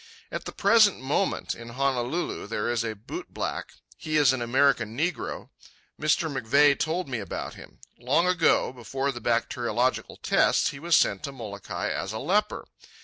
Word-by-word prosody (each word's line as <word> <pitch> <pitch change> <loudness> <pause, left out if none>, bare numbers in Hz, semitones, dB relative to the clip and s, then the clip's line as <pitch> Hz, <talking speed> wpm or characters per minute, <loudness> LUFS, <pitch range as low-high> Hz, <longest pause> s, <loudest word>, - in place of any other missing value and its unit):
At - - -5
the - - -5
present 215 - +4
moment, 140 +9 -1
in 115 0 -10
Honolulu, 130 +3 -1
there 110 +1 -1
is 120 -1 0
a 110 -1 -3
bootblack. 130 - -6 0.2
He 155 -1 -1
is 140 -4 +5
an 130 - -3
American 120 -2 +2
negro. 175 +4 -2 0.5
Mr. 155 +2 +2
McVeigh 140 +1 +3
told 170 +3 -1
me 125 -4 -3
about 100 -4 -5
him. - - -14 0.2
Long 130 +8 +2
ago, 180 -7 +2
before 135 +3 -3
the 120 -3 -8
bacteriological 120 +2 0
tests, - - +2
he 135 - -9
was 170 +1 +2
sent 100 - +3
to 140 - -5
Molokai 105 -7 -5
as 95 - -3
a - - -3
leper. 205 - 0
130 Hz, 160 wpm, -26 LUFS, 115-155 Hz, 0.5 s, is